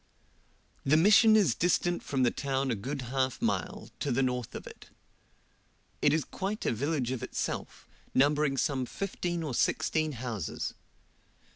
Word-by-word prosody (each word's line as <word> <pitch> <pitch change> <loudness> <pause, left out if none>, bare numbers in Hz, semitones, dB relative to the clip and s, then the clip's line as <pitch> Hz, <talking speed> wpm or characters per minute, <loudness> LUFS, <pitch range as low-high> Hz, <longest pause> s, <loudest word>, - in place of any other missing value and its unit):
The 145 +3 +4
Mission 215 +5 +7
is 195 - +4
distant 175 +2 +1
from 135 -2 -1
the 120 - +4
town 135 -1 -1
a - - +1
good 130 +6 -4
half 130 -1 0
mile, 210 -3 -2
to 145 - -1
the 135 +2 +2
north 125 -2 -2
of - - -7
it; - - -12 1.1
it - - +4
is 155 -2 +1
quite 200 +3 -4
a - - +2
village 135 +1 -1
of 130 -4 -3
itself, - - -4 0.3
numbering 145 0 +3
some 130 -2 0
fifteen 175 -2 -3
or 145 -5 -3
sixteen 155 +5 +1
houses. 115 - -4
140 Hz, 150 wpm, -30 LUFS, 130-175 Hz, 1.1 s, Mission